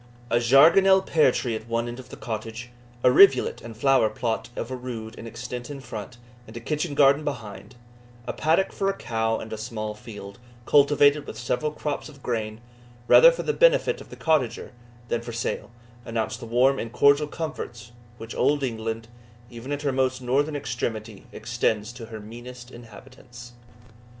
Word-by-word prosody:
A 120 Hz, -, +4 dB
jargonelle 170 Hz, +10 st, +6 dB
pear 160 Hz, -4 st, +3 dB
tree 120 Hz, -3 st, -2 dB
at 110 Hz, +1 st, -7 dB
one 115 Hz, 0 st, -1 dB
end 120 Hz, +1 st, -7 dB
of 125 Hz, -1 st, -12 dB
the -, -, -10 dB
cottage, 115 Hz, +1 st, -6 dB, 0.3 s
a 125 Hz, -, +6 dB
rivulet 135 Hz, -2 st, +5 dB
and 115 Hz, -1 st, -10 dB
flower 135 Hz, -3 st, +3 dB
plot 115 Hz, 0 st, -3 dB
of 120 Hz, -, -5 dB
a -, -, -2 dB
rood 120 Hz, -3 st, -7 dB
in 115 Hz, -, -9 dB
extent 120 Hz, +2 st, -7 dB
in 145 Hz, -1 st, -7 dB
front, 120 Hz, -1 st, -8 dB, 0.3 s
and 110 Hz, +2 st, -10 dB
a -, -, -4 dB
kitchen 150 Hz, +4 st, -3 dB
garden 140 Hz, +1 st, +5 dB
behind; 125 Hz, -4 st, -6 dB, 0.5 s
a -, -, -3 dB
paddock 165 Hz, +5 st, +1 dB
for 195 Hz, -, -1 dB
a 195 Hz, -, -1 dB
cow, 115 Hz, -1 st, -1 dB
and 110 Hz, -, -7 dB
a 110 Hz, -, -5 dB
small 110 Hz, -1 st, -4 dB
field, 105 Hz, -1 st, -11 dB, 0.3 s
cultivated 145 Hz, 0 st, +4 dB
with -, -, -8 dB
several 125 Hz, +4 st, -1 dB
crops 150 Hz, 0 st, -4 dB
of 140 Hz, -3 st, -16 dB
grain, 110 Hz, -2 st, -3 dB, 0.5 s
rather -, -, +8 dB
for -, -, -5 dB
the 450 Hz, -, 0 dB
benefit -, -, +3 dB
of -, -, -13 dB
the -, -, -10 dB
cottager 155 Hz, -7 st, 0 dB, 0.4 s
than 120 Hz, -, -1 dB
for 120 Hz, 0 st, -8 dB
sale, 115 Hz, +1 st, -3 dB, 0.3 s
announced 115 Hz, -1 st, -3 dB
the 115 Hz, -, -8 dB
warm 130 Hz, +4 st, +3 dB
and 115 Hz, -, -5 dB
cordial 140 Hz, +3 st, +4 dB
comforts 120 Hz, -7 st, -6 dB, 0.3 s
which 115 Hz, 0 st, -8 dB
Old 145 Hz, -1 st, +1 dB
England, 115 Hz, -2 st, -3 dB, 0.4 s
even 120 Hz, +4 st, -8 dB
at 145 Hz, 0 st, -3 dB
her 140 Hz, -, +1 dB
most 130 Hz, 0 st, 0 dB
northern 140 Hz, +4 st, 0 dB
extremity, 115 Hz, -6 st, -4 dB
extends 110 Hz, +1 st, -2 dB
to 120 Hz, -2 st, -9 dB
her 110 Hz, -1 st, -8 dB
meanest 120 Hz, +3 st, -10 dB
inhabitants. 120 Hz, +1 st, -13 dB
120 Hz, 180 wpm, -25 LUFS, 115-140 Hz, 0.5 s, rather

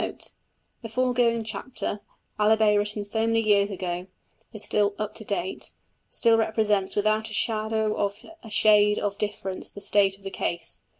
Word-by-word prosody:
Note. -, -, -5 dB, 0.5 s
The 225 Hz, -, -7 dB
foregoing 240 Hz, -1 st, +1 dB
chapter, 220 Hz, 0 st, -4 dB, 0.4 s
albeit 215 Hz, 0 st, +4 dB
written 205 Hz, 0 st, 0 dB
so 220 Hz, +2 st, 0 dB
many 225 Hz, 0 st, +2 dB
years 205 Hz, -2 st, +3 dB
ago, 180 Hz, -2 st, -4 dB, 0.4 s
is 215 Hz, -, -3 dB
still 205 Hz, -1 st, +1 dB
"up 215 Hz, -1 st, -3 dB
to 220 Hz, -, -9 dB
date" 190 Hz, -3 st, -4 dB, 0.4 s
still 230 Hz, -1 st, +3 dB
represents 215 Hz, -3 st, +1 dB
without 215 Hz, +1 st, +1 dB
a 210 Hz, -, -5 dB
shadow 220 Hz, -1 st, 0 dB
of 200 Hz, -1 st, -1 dB, 0.3 s
a 225 Hz, -, -11 dB
shade 210 Hz, -1 st, +4 dB
of 200 Hz, 0 st, -2 dB
difference 200 Hz, -2 st, -4 dB
the -, -, -11 dB
state 195 Hz, -1 st, +2 dB
of 200 Hz, -, -24 dB
the 195 Hz, -, -6 dB
case. 170 Hz, -3 st, -4 dB
210 Hz, 165 wpm, -26 LUFS, 200-220 Hz, 0.5 s, albeit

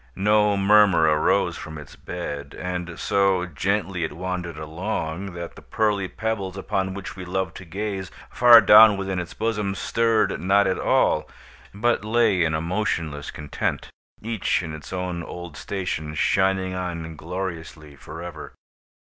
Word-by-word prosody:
No 105 Hz, +1 st, +3 dB
murmur 100 Hz, -3 st, +5 dB
arose 75 Hz, -1 st, +2 dB
from 80 Hz, -, -8 dB
its 75 Hz, -, -11 dB
bed, 70 Hz, -1 st, -6 dB
and 90 Hz, -1 st, -4 dB
so 95 Hz, -2 st, +2 dB
gently 95 Hz, +2 st, -1 dB
it 80 Hz, -, -3 dB
wandered 90 Hz, -1 st, -4 dB
along, 85 Hz, +3 st, -4 dB
that 85 Hz, 0 st, -6 dB
the -, -, -12 dB
pearly 105 Hz, -4 st, 0 dB
pebbles 100 Hz, -3 st, -3 dB
upon 95 Hz, 0 st, -2 dB
which 100 Hz, -1 st, -7 dB
we 95 Hz, -, -7 dB
loved 90 Hz, -1 st, -3 dB
to 95 Hz, -, -10 dB
gaze, 95 Hz, +1 st, -4 dB, 0.2 s
far 120 Hz, -1 st, +8 dB
down 105 Hz, -1 st, +8 dB
within 95 Hz, -1 st, -2 dB
its 85 Hz, -, -6 dB
bosom, 105 Hz, -3 st, -1 dB
stirred 110 Hz, -4 st, +1 dB
not 100 Hz, +3 st, +3 dB
at 95 Hz, -1 st, 0 dB
all, -, -, +2 dB, 0.4 s
but 115 Hz, +2 st, 0 dB
lay 110 Hz, -4 st, +2 dB
in 80 Hz, -1 st, +1 dB
a 80 Hz, -, -1 dB
motionless 85 Hz, -5 st, -2 dB
content, 75 Hz, -2 st, -4 dB, 0.3 s
each 110 Hz, -4 st, 0 dB
in 80 Hz, -2 st, -6 dB
its 75 Hz, -, -9 dB
own 90 Hz, -2 st, -3 dB
old 85 Hz, -1 st, -8 dB
station, 80 Hz, -6 st, -4 dB
shining 95 Hz, +2 st, +1 dB
on 85 Hz, -3 st, -5 dB
gloriously 80 Hz, -3 st, -6 dB
forever. -, -, -9 dB
95 Hz, 145 wpm, -24 LUFS, 85-100 Hz, 0.4 s, far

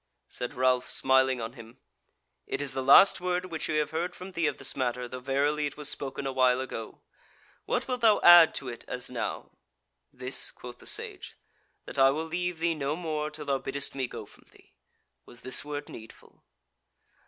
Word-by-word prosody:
Said 125 Hz, -, -6 dB
Ralph, 130 Hz, 0 st, +2 dB
smiling 130 Hz, -1 st, +3 dB
on 115 Hz, +1 st, -5 dB
him: 115 Hz, 0 st, -13 dB, 0.7 s
"It -, -, -3 dB
is 145 Hz, -2 st, -1 dB
the 135 Hz, -, -2 dB
last 155 Hz, +8 st, +7 dB
word 180 Hz, 0 st, -1 dB
which 165 Hz, -3 st, -5 dB
we 155 Hz, -, -1 dB
have 150 Hz, 0 st, 0 dB
heard 175 Hz, +3 st, -3 dB
from 185 Hz, +1 st, -9 dB
thee 170 Hz, -3 st, 0 dB
of -, -, -2 dB
this -, -, -2 dB
matter, 125 Hz, -1 st, -2 dB
though 130 Hz, +1 st, -7 dB
verily 145 Hz, +3 st, 0 dB
it 145 Hz, -, -9 dB
was 150 Hz, -1 st, -2 dB
spoken 140 Hz, -1 st, -4 dB
a 135 Hz, -, -1 dB
while 130 Hz, -1 st, +3 dB
ago. 115 Hz, -4 st, -7 dB, 0.6 s
What -, -, -1 dB
wilt 250 Hz, -1 st, -3 dB
thou 220 Hz, -2 st, +5 dB
add 175 Hz, -2 st, +8 dB
to 135 Hz, -, -5 dB
it 120 Hz, -2 st, -7 dB
as 125 Hz, 0 st, -5 dB
now?" 125 Hz, -, -4 dB, 0.6 s
"This," 130 Hz, +1 st, -1 dB
quoth 125 Hz, 0 st, -11 dB
the -, -, -9 dB
Sage, -, -, -4 dB, 0.5 s
"that -, -, -6 dB
I 135 Hz, 0 st, +7 dB
will 155 Hz, +4 st, -2 dB
leave 180 Hz, +1 st, -3 dB
thee 165 Hz, +1 st, 0 dB
no 145 Hz, -1 st, -2 dB
more 155 Hz, -3 st, -3 dB
till 150 Hz, -1 st, -8 dB
thou 140 Hz, -1 st, 0 dB
biddest 140 Hz, +1 st, -4 dB
me 130 Hz, -2 st, -2 dB
go -, -, -8 dB
from -, -, -21 dB
thee. -, -, -23 dB, 0.5 s
Was 120 Hz, -, -12 dB
this 130 Hz, 0 st, 0 dB
word 145 Hz, 0 st, -6 dB
needful?" 110 Hz, 0 st, -13 dB
140 Hz, 200 wpm, -28 LUFS, 130-160 Hz, 0.7 s, add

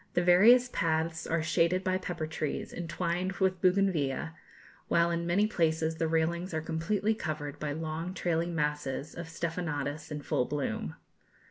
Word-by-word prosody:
The 175 Hz, -, +3 dB
various 220 Hz, +8 st, +7 dB
paths 160 Hz, -5 st, -1 dB
are 165 Hz, -1 st, 0 dB
shaded 170 Hz, +3 st, +2 dB
by 185 Hz, 0 st, +1 dB
pepper 175 Hz, -4 st, -3 dB
trees, 155 Hz, -1 st, -3 dB
entwined 175 Hz, +2 st, -2 dB
with 185 Hz, -1 st, 0 dB
bougainvillæa, 180 Hz, -7 st, +2 dB, 0.6 s
while 170 Hz, 0 st, +3 dB
in 170 Hz, 0 st, -1 dB
many 190 Hz, +5 st, +3 dB
places 160 Hz, -5 st, 0 dB
the 165 Hz, -, +1 dB
railings 165 Hz, +2 st, 0 dB
are -, -, +1 dB
completely 165 Hz, +7 st, 0 dB
covered 150 Hz, -6 st, -4 dB
by 150 Hz, -1 st, -2 dB
long 160 Hz, +3 st, -4 dB
trailing 170 Hz, -1 st, 0 dB
masses 150 Hz, -1 st, -2 dB
of 170 Hz, -1 st, -6 dB
stephanotis 160 Hz, -3 st, -3 dB
in 150 Hz, -1 st, -4 dB
full 125 Hz, -, +1 dB
bloom. 110 Hz, -, -3 dB
165 Hz, 150 wpm, -30 LUFS, 155-180 Hz, 0.6 s, various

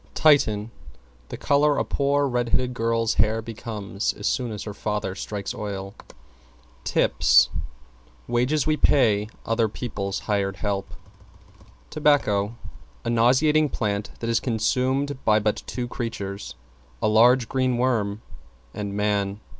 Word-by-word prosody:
=TITIAN= 115 Hz, -8 st, +3 dB, 0.6 s
The -, -, -6 dB
color 145 Hz, +1 st, +2 dB
a -, -, 0 dB
poor 140 Hz, +1 st, +1 dB
red 120 Hz, -3 st, -1 dB
headed 125 Hz, +1 st, 0 dB
girl's 115 Hz, -1 st, 0 dB
hair 110 Hz, +1 st, +1 dB
becomes 110 Hz, -3 st, -4 dB
as 100 Hz, -, -8 dB
soon 125 Hz, -1 st, 0 dB
as 105 Hz, -1 st, -5 dB
her 105 Hz, -, -6 dB
father 105 Hz, -2 st, -3 dB
strikes 100 Hz, 0 st, -5 dB
oil. 100 Hz, -2 st, -5 dB, 0.9 s
=TIPS= -, -, +4 dB, 0.8 s
Wages 125 Hz, +5 st, +1 dB
we 155 Hz, -1 st, +1 dB
pay 110 Hz, -8 st, +3 dB, 0.2 s
other 115 Hz, -1 st, +1 dB
people's 100 Hz, -4 st, -4 dB
hired 100 Hz, -2 st, -1 dB
help. 100 Hz, -1 st, -3 dB, 1.0 s
=TOBACCO= 120 Hz, -9 st, +2 dB, 0.5 s
A 120 Hz, -, 0 dB
nauseating 140 Hz, +6 st, +3 dB
plant 105 Hz, -4 st, -2 dB
that 115 Hz, -, -3 dB
is 115 Hz, -, +2 dB
consumed 130 Hz, +4 st, 0 dB
by 105 Hz, -1 st, +4 dB
but 105 Hz, 0 st, 0 dB
two 125 Hz, -1 st, -4 dB
creatures; 100 Hz, -, -5 dB, 0.4 s
a -, -, +1 dB
large, 120 Hz, +3 st, +5 dB
green 130 Hz, -1 st, 0 dB
worm 110 Hz, -5 st, 0 dB, 0.5 s
and 100 Hz, -1 st, -5 dB
man. 100 Hz, -1 st, 0 dB
115 Hz, 130 wpm, -24 LUFS, 105-130 Hz, 1.0 s, large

